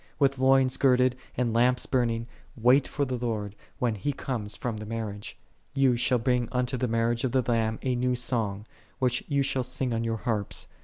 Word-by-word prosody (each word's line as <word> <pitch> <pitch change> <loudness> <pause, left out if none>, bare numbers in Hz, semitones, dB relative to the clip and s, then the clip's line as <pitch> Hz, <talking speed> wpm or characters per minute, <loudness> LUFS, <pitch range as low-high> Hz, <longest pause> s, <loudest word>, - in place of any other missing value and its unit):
With 135 -2 +2
loins 130 0 +4
girded, 130 -2 +3 0.2
and 120 -3 0
lamps 125 +2 +3
burning, 115 -3 0 0.3
wait 125 +4 +4
for 145 - -1
the 125 -2 -3
Lord, 105 -4 -3 0.2
when 120 -2 0
He 125 +8 -2
cometh 115 -6 -4
from 120 -3 -3
the 105 - -7
mar 110 -2 -3
riage.6 105 0 -8 0.4
Ye 135 -3 +4
shall 120 +1 +2
bring 120 0 0
unto 125 0 0
the 125 0 -1
marriage 115 +1 0
of 130 -2 -1
the 130 -1 +3
Lamb 110 -2 +1
a 130 - +1
new 125 +1 +1
sohg, 115 -5 -1 0.3
which 125 -2 +1
ye 140 -2 +1
shall 135 -1 0
sing 125 0 -2
on 115 0 -1
your 115 0 -1
harps. 105 -3 -2
125 Hz, 200 wpm, -27 LUFS, 115-130 Hz, 0.4 s, loins